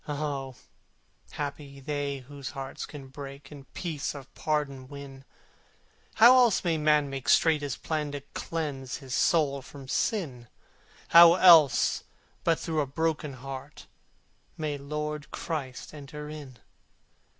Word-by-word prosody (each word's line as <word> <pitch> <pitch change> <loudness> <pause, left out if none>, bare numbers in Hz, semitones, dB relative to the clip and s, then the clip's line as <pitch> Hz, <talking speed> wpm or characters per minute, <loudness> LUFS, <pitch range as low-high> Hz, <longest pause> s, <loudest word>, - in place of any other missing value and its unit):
Ah! 140 -3 -3 0.8
happy 140 -1 -6
they 140 -1 -3
whose 140 -2 -7
hearts 135 -1 -6
can 140 -3 -10
break 140 +1 -10
And 140 -2 -12
peace 155 -5 -3
of 135 -2 -11
pardon 140 -4 -2
win! 140 -1 -10 0.9
How 235 +3 +8
else 240 -5 +4
may 165 -3 +1
man 150 -1 +3
make 135 -1 -5
straight 160 -2 +4
his 145 -3 -3
plan 150 -2 -3
And 140 - -6
cleanse 145 -5 -4
his 135 -3 -8
soul 140 -4 +2
from 135 0 -12
Sin? 135 - -1 0.6
How 170 0 +9
else 165 -7 +6 0.4
but 165 -1 +2
through 160 -2 -1
a 140 - -2
broken 155 0 -1
heart 135 +2 -9 0.7
May 155 -2 -2
Lord 150 +1 -4
Christ 140 -6 -5
enter 150 0 -8
in? 145 -5 -9
145 Hz, 130 wpm, -28 LUFS, 135-155 Hz, 0.9 s, How